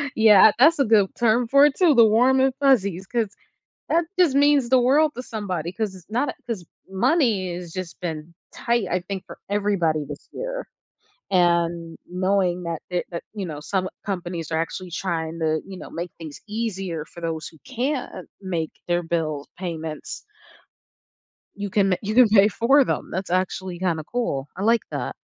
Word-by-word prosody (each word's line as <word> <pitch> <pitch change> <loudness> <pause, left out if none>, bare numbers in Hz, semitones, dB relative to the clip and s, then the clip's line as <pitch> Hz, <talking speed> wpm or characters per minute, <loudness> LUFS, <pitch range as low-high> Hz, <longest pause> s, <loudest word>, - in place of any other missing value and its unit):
Yeah, 215 -1 +7
that's 310 +4 +6
a 275 - +4
good 210 -3 +4
term 235 +1 +2
for 280 +4 +6
it, 290 - +2
too, 345 -5 +5
the 230 - +8
warm 250 +5 +4
and 265 0 +3
fuzzies 200 -10 +2
'cause 225 -3 -2 0.5
that 335 +1 +2
just 330 -7 +4
means 285 -3 +4
the 260 0 +5
world 290 +5 +3
to 250 - -6
somebody 185 -8 -4
'cause 210 -1 -3
it's 185 0 -15
not 250 +6 0
a - - -9
'cause 220 -7 -4 0.2
money 210 - +1
has 175 -1 -8
just 185 -2 -7
been 160 -1 -5 0.2
tight, 235 -4 0
I 180 - +1
think, 190 +1 -6
for - - -11
everybody 195 -7 +1
this 145 0 -10
year, - - -5 0.7
and 170 -2 +1
knowing 180 -1 0
that 170 -2 -4
it 180 -1 -1
that, 170 - -5
you 205 -3 -4
know, 155 -4 -6
some 185 +3 -2 0.2
companies 175 -4 -4
are 160 - +1
actually 180 +2 -6
trying 165 -2 -3
to, 155 -1 0
you 195 -1 -9
know, - - -9
make 170 0 -5
things 155 -3 -9
easier 195 -7 -3
for 170 - -13
those 160 -2 -3
who 160 - -14
can't 260 - -3
make 170 -4 -3 0.2
their 175 0 +1
bill 155 -4 -2
payments 160 -4 -6 1.3
you 205 -1 -4
can 195 -1 +2
you 215 +1 -3
can 250 -1 +7
pay 205 -1 +6
for 265 +6 +4
them, - - -3
that's 190 +1 -4
actually 185 0 -2
kinda 170 -4 -1
cool, 165 - -2
I 190 - -4
like 230 +2 +3
that. - - -3
190 Hz, 180 wpm, -23 LUFS, 170-235 Hz, 1.3 s, the